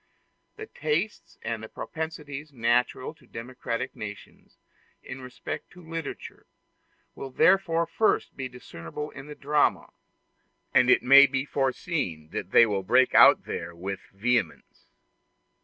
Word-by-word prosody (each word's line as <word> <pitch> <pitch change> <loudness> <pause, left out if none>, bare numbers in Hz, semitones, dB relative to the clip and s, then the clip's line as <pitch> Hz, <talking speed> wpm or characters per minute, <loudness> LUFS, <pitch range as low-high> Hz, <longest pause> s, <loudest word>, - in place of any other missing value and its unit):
The 435 - -8
tastes 165 - -3
and 110 -1 -5
propensities 155 -2 -6
natural 125 +2 0
to - - -24
democratic 120 +1 -5
nations, 105 -1 -10 0.5
in 130 +1 -8
respect 125 -1 -7
to 180 -2 -15
literature, 165 -2 -7 0.7
will 135 - -7
therefore 170 +3 +3
first 220 +6 0
be 135 -1 -4
discernible 125 - -8
in 135 0 -10
the 150 - -9
drama, 145 +1 +1 0.8
and 125 0 +5
it - - +5
may 140 +2 +9
be 135 0 -2
foreseen 130 - -2
that 90 - -5
they 115 - +7
will 100 -3 -1
break 125 +7 +3
out - - +7
there 85 - -5
with 95 +2 -5
vehemence. 110 -2 -2
130 Hz, 125 wpm, -27 LUFS, 115-150 Hz, 0.8 s, may